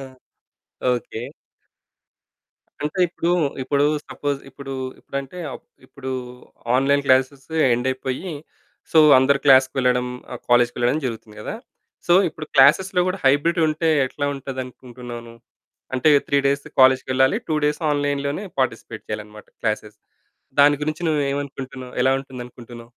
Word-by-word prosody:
ఆ! - - -7 0.9
ఓకే. 120 -2 -4 1.6
అంటే 150 +5 -3
ఇప్పుడు, 170 0 -3 0.3
ఇప్పుడు 140 +2 +1 0.2
సపోజ్, 145 -1 -3
ఇప్పుడు, 135 0 -8 0.3
ఇప్పుడంటే, 140 +5 -6 0.5
ఇప్పుడు 130 0 -8 0.7
ఆన్లైన్ 140 +2 +2
క్లాస్ 130 0 +4 0.4
ఎండ్ 120 +2 -1
అయిపోయి 130 +7 -4 0.6
సో 160 - +6 0.2
అందరూ 135 +2 +4
క్లాస్‌కి 130 -1 +6
వెళ్లడం, 125 -1 +2 0.4
కాలేజ్‌కి 120 0 +4
వెళ్ళడం 125 +5 +1
జరుగుతుంది 110 -3 -6
కదా. - - -5 0.5
సో 175 - +5 0.2
ఇప్పుడు 155 0 -8
క్లాస్‌లో 180 +7 +5
కూడా 185 +1 -1
హైబ్రిడ్ 145 +6 +3
ఉంటే 155 +2 -1 0.2
ఎట్లా 145 +2 -4
ఉంటది 135 -1 -6
అనుకుంటున్నావు 120 -1 -10
నువ్వు? 115 0 -15 0.5
అంటే 130 +4 +3 0.2
3 140 - +2
డేస్ 140 +1 0 0.2
కాలేజ్‌కి 130 0 +5
వెళ్ళాలి, 130 +8 +3
2 155 - 0
డేస్ 150 0 0
ఆన్లైన్‌లోనే 145 +3 -1 0.2
పార్టిసిపేట్ 130 -3 -2
చేయాలన్నమాట 105 0 -7
క్లాసెస్. 105 0 -3 0.6
దాని 145 +1 +6
గురించి 155 +2 -3
నువ్వు 150 -2 +1
ఏమనుకుంటున్నావు? 135 -2 -6
ఎలా 130 +1 +4
ఉంటుంది 130 -2 -9
అనుకుంటున్నావు? 120 -1 -12
135 Hz, 130 wpm, -22 LUFS, 125-145 Hz, 1.6 s, సో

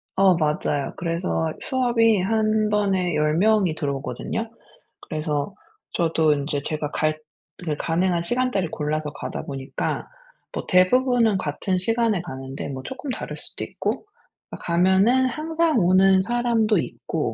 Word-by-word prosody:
어 190 -2 +5
맞아요. 150 -3 -1
그래서 165 -2 -1
수업이 235 -5 +3
1 215 +1 +1
번에 190 -5 +1
10 150 +1 +2
명이 200 -5 +3
들어오거든요. 140 - -3 0.5
그래서 155 +2 -3 0.4
저도 160 -2 +2
인제 145 0 -2
제가 150 -2 -3
갈 155 0 0 0.5
그 150 -2 -1
가능한 170 +2 0
시간대를 240 -3 0
골라서 150 0 -2
가다 145 - -5
보니까 135 -1 -3 0.5
뭐 - - -5
대부분은 225 +2 +4
같은 180 +5 -1
시간에 225 -2 +1
가는데 135 -3 -6
뭐 130 -1 -6
쪼끔 265 +1 -7
다를 - - -4
수도 - - -1
있고 - - -3 0.5
아 - - -6
가면은 190 +9 +3
항상 315 +1 +1
오는 190 +1 +5
사람도 235 -1 +1
있고 - - -3
185 Hz, 280 characters per minute, -23 LUFS, 155-225 Hz, 0.5 s, 어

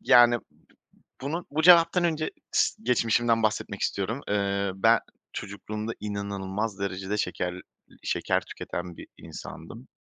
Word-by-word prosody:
Yani, 120 -1 +7
b - - -16 0.8
bunu 160 +6 -3
bu 155 +2 0
cevaptan 175 +1 +7
önce 155 -2 0 0.2
s - - +2
geçmişimden 115 -1 +2
bahsetmek 110 -1 -1
istiyorum. 110 +7 -1
Eee, 100 -1 0
ben 115 +4 +5 0.3
çocukluğumda 105 +2 -5
inanılmaz 100 0 -3
derecede 95 +1 -2
şeker 90 -3 -1
iii, 90 - -15
şeker - - +1
tüketen 85 -1 -6
bir - - -10
insandım. 115 +11 -9
105 Hz, 125 wpm, -27 LUFS, 100-120 Hz, 0.8 s, Yani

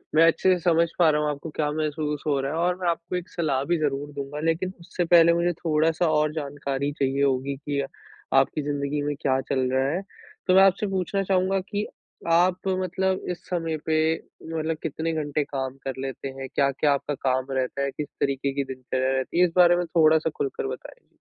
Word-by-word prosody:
मैं 165 - +7
अच्छे 185 +3 +3
से 180 - -1
समझ 170 -1 +4
पा 165 -2 +6
रहा 150 0 +2
हूँ 150 - 0
आपको 150 +2 -5
क्या 150 -1 0
महसूस 150 -1 -2
हो 140 -2 +2
रहा 135 +1 -2
है - - -2
और 180 +1 +2
मैं 175 - 0
आपको 170 +2 -3
एक 180 +2 -4
सलाह 140 -6 -1
भी 175 0 +1
ज़रूर 145 -1 -1
दूँगा, 140 +1 -5
लेकिन 165 +4 0
उससे 175 0 -3
पहले 170 0 +6
मुझे 175 +1 +1
थोड़ा-सा 160 +1 +1
और 150 0 +2
जानकारी 140 -2 -3
चाहिए 135 +1 +1
होगी 135 0 +1
कि 145 0 -2 0.6
आपकी 135 +3 +2
ज़िंदगी 145 0 -2
में 145 0 -1
क्या 130 -1 +2
चल 130 -2 +1
रहा 130 +1 +2
है? 180 +4 -1 0.5
तो 185 - +4
मैं 190 - +8
आपसे 195 +2 +3
पूछना 195 +1 -1
चाहूँगा 190 0 +1
कि 205 +1 -1 0.5
आप 180 +3 +3
मतलब 185 0 0
इस 175 - -7
समय 165 -3 -1
पे 155 0 +2 0.6
मतलब 160 0 -1
कितने 160 +1 -2
घंटे 150 -1 -1
काम 135 -1 -4
कर 135 - -3
लेते 135 0 -5
हैं? 135 0 -6
क्या-क्या 140 +1 +2
आपका 145 +1 -2
काम 130 0 0
रहता 130 +1 -1
है? 140 0 0
किस 150 - -5
तरीके 140 0 0
की 140 0 -1
दिनचर्या 130 +1 -1
रहती 130 +6 -1
है? 180 - +7
इस 170 - -2
बारे 175 -1 +6
में 175 - 0
थोड़ा-सा 160 -1 +3
खुलकर 135 -1 -2
बताएँ। 130 -1 -10
150 Hz, 205 wpm, -25 LUFS, 140-170 Hz, 0.6 s, मैं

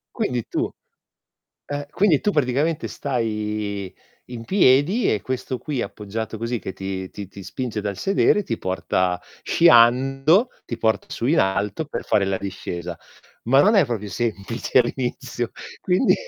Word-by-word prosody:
Quindi 125 - -1
tu - - -1 1.0
eh, 145 0 -3
quindi 175 -4 +3
tu 210 - +1
praticamente 150 0 0
stai 105 -6 -3 0.4
in 115 -2 -7
piedi 180 - +4
e 105 - 0
questo 130 0 -3
qui 135 0 -3
appoggiato 105 +2 -5
così 115 +2 -2
che 95 - -6
ti 95 -1 -5
ti 100 -2 -8
ti 100 0 -11
spinge 110 +4 -4
dal 100 -1 -3
sedere, 200 - +3
ti 115 - -3
porta 90 -1 -1 0.2
sciando, 135 - +5 0.2
ti 120 - -4
porta 110 -4 +1
su 120 - -3
in 160 +5 +3
alto 100 +7 0
per 145 - -5
fare 100 - +2
la 95 0 0
discesa. 90 -3 -5 0.5
Ma 135 +4 +5
non 210 +6 +4
è 195 -6 +5
proprio 110 -5 -4
semplice 115 +3 0
all'inizio, 120 -1 -2 0.3
quindi 185 +8 +3
120 Hz, 145 wpm, -23 LUFS, 100-145 Hz, 1.0 s, sciando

